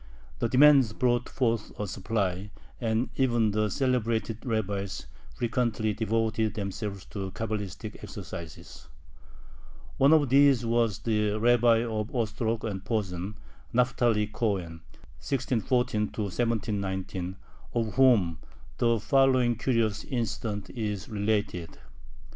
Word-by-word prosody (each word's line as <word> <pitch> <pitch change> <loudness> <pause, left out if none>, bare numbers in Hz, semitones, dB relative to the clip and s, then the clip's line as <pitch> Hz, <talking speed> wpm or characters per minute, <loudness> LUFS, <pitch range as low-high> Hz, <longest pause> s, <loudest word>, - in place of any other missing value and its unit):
The 115 - 0
demand 130 -4 +6
brought 120 -1 +1
forth 115 -4 -1
a 105 - -1
supply, 100 -1 -2 0.3
and 115 +1 0
even 120 -5 +2
the 105 +1 +1
celebrated 115 -2 0
rabbis 100 -5 -2 0.3
frequently 115 -2 0
devoted 110 0 0
themselves 100 -1 -4
to 95 -2 -4
Cabalistic 105 0 -5
exercises. 80 -5 -9 1.1
One 135 +2 +5
of 150 -4 +5
these 135 -2 +5
was 115 -3 +1
the 105 -2 0
Rabbi 120 0 +4
of 110 -2 -3
Ostrog 115 -1 -1
and 100 -3 -4
Posen, 100 -3 -2 0.4
Naphtali 120 -3 +2
Cohen 95 -7 -2 0.4
(1640 125 -3 0 0.2
1719), 100 -4 -2 0.4
of 115 -3 0
whom 105 -12 +4 0.4
the 115 -1 +3
following 130 +1 +3
curious 115 -3 0
incident 110 -5 -3
is 105 -4 -4
related. 105 -5 -1
110 Hz, 105 wpm, -28 LUFS, 100-120 Hz, 1.1 s, demand